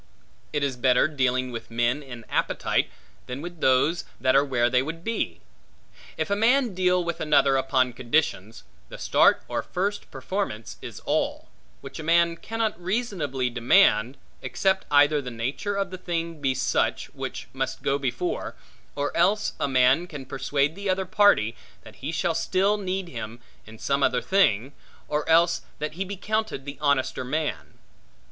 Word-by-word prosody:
It 145 -1 -1
is 135 -3 -1
better 125 +1 +4
dealing 130 -3 0
with 115 -1 -7
men 120 +4 0
in 120 -5 -10
appetite, - - 0 0.4
than 125 +2 -5
with 175 +1 -8
those 130 +7 +3 0.2
that 130 0 +2
are 140 - +6
where 125 -4 +1
they 125 +1 +3
would 165 +4 -6
be. 230 +2 -2 0.8
If - - -2
a - - +3
man 240 +2 +3
deal 180 -1 +2
with 170 0 -4
another 140 -3 +4
upon 130 -2 +1
conditions, 120 -4 -1 0.3
the - - -8
start - - +4
or - - -2
first 200 +3 -3
performance 115 - -4
is - - -8
all; - - -1 0.3
which - - -9
a - - -5
man 170 +1 +3
cannot 225 -1 -3
reasonably 175 - -1
demand, 120 - +4 0.2
except 190 0 0
either 145 +1 +5
the 130 - -6
nature 130 - -3
of 195 -2 -2
the 185 - -7
thing 165 -3 -3
be 135 -2 +1
such, 130 0 0
which - - -6
must - - -3
go 140 +1 +1
before; 135 +6 -3 0.4
or 145 0 -2
else 210 +2 +2
a - - +1
man 130 +5 +3
can 145 -6 -8
persuade 140 +2 0
the 200 +2 -4
other 190 0 +1
party, 180 - +3 0.3
that - - -14
he 140 +4 -4
shall 165 +1 0
still 190 +5 +1
need 190 -1 -3
him 115 -4 -7 0.3
in 110 0 -12
some 140 +4 0
other - - +3
thing; 135 - +2 0.3
or 150 +1 -2
else 170 +1 +4 0.2
that 150 +1 -4
he 185 +4 -3
be 195 +1 -6
counted 215 -8 -2
the 140 -2 -7
honester 140 -3 +1
man. 150 +4 -3
145 Hz, 165 wpm, -25 LUFS, 130-185 Hz, 0.8 s, are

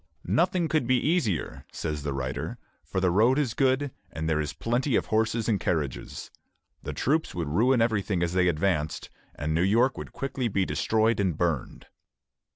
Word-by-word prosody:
"Nothing 170 - +2
could 155 -6 0
be 130 0 +4
easier," 150 - 0
says 75 -2 -3
the 70 0 -3
writer, 65 -1 -3 0.3
"for - - -3
the 95 -1 +2
road 115 +8 +4
is 135 -7 0
good, 135 +1 +1 0.2
and 80 0 -4
there 80 -1 +1
is 75 -1 -3
plenty 120 - 0
of - - +2
horses 110 +1 0
and 105 -4 +2
carriages. 75 -6 -3 0.5
The - - -5
troops 155 +4 0
would 85 -4 -2
ruin 115 - +3
everything 100 -5 0
as 85 0 -1
they 90 0 +3
advanced, 80 -2 0 0.2
and 75 +2 -2
New 80 - +2
York 115 +8 +3
would - - -7
quickly 135 -2 -2
be 100 -3 +1
destroyed 110 +2 +1
and 95 -6 0
burned." 80 -7 -2
100 Hz, 175 wpm, -27 LUFS, 80-125 Hz, 0.5 s, be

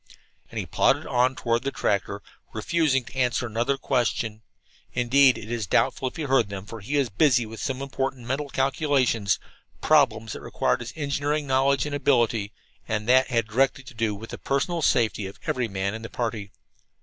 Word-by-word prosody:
And - - -9
he - - -2
plodded - - +2
on 125 +1 +2
toward 115 -1 0
the 140 - -1
tractor, 100 -5 -1 0.3
refusing 150 -6 +1
to - - -13
answer 125 -1 +1
another 120 +4 0
question. 120 -4 -1 0.5
Indeed, 130 +2 +4
it 110 +2 -8
is 115 -5 -2
doubtful 130 - +1
if - - -6
he 165 - -4
heard 135 -7 +2
them, 100 -1 -6
for 115 +2 -8
he 130 +9 -2
was 135 -4 +1
busy 125 +2 +3
with 110 +1 -9
some 135 0 -3
important 135 -2 -3
mental 140 +3 -2
calculations 130 -6 +1 0.4
problems 115 -8 +3
that - - -8
required - - 0
his 120 +1 -7
engineering 145 0 -1
knowledge 135 +1 +2
and 150 - -4
ability, 120 -7 +1 0.4
and 105 0 -2
that 130 +1 +5
had 115 -3 +1
directly 130 +4 +1
to 140 - -12
do 110 -2 -1
with 110 +3 -9
the - - -7
personal 150 +5 -1
safety 110 -7 +1
of 95 - -10
every 125 -2 0
man 100 -1 -2
in 110 - -6
the 115 - -7
party. 110 -4 -3
125 Hz, 185 wpm, -25 LUFS, 110-135 Hz, 0.5 s, that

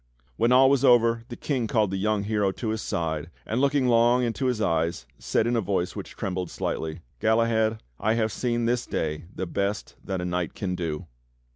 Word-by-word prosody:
When 115 +2 +2
all 130 +1 +7
was 135 -1 +3
over 115 -2 +4
the 120 - -6
King 125 -3 -1
called 105 -3 +1
the 95 - -1
young 105 +1 0
hero 105 -2 +1
to 115 - -4
his 110 0 -2
side, 80 -1 -2 0.2
and 115 +4 -1
looking 140 -2 +2
long 120 +1 +4
into 120 +3 -1
his 125 -3 0
eyes 80 - 0
said - - +1
in 120 +1 +1
a 115 - +2
voice 95 -2 -1
which - - -7
trembled 90 -2 -3
slightly: 80 0 -3 0.2
"Galahad, 110 0 +2 0.2
I 110 +1 +1
have 110 -1 +1
seen 120 0 -1
this 120 +1 0
day 75 +1 -2
the 95 - -2
best 100 +3 -2
that 95 -1 -3
a 90 - -3
knight 90 -1 -2
can 95 -3 -2
do!" 80 -4 -3
110 Hz, 205 wpm, -26 LUFS, 90-120 Hz, 0.2 s, all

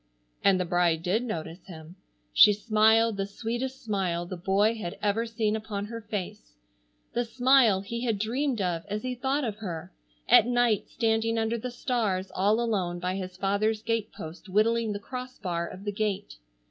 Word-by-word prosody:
And 195 -2 +4
the 180 - 0
bride 170 -2 +1
did 190 +6 +1
notice 170 -7 -5
him. 160 -1 -11 0.4
She 210 - +8
smiled 220 +1 +3
the 195 0 -1
sweetest 240 +6 -4
smile 185 -6 -1
the 185 - -6
boy 195 +5 +2
had 210 -7 -6
ever 210 +3 0
seen 225 -2 0
upon 215 -2 -4
her 230 +2 -7
face, 185 - -6 0.6
the 240 - +1
smile 245 -4 +4
he 235 +4 -5
had 225 -4 0
dreamed 240 +3 -1
of 175 -3 -1
as 210 +1 -3
he 255 0 -2
thought 265 +4 -1
of 215 -4 -3
her, 175 - -6 0.3
at 225 - +7
night 240 -4 +2
standing 225 0 +1
under 225 +1 0
the 250 - -4
stars 220 -6 -1
all 205 +4 +2
alone 195 -7 -1
by 180 +1 -2
his 185 -1 -5
father's 210 +3 0
gate 230 -2 -1
post 165 +5 -9
whittling 225 +3 +2
the 205 - -2
cross 255 +4 -7
bar 170 -4 -2
of 185 +3 -10
the 205 - -2
gate. 195 - -2
210 Hz, 180 wpm, -28 LUFS, 185-230 Hz, 0.6 s, She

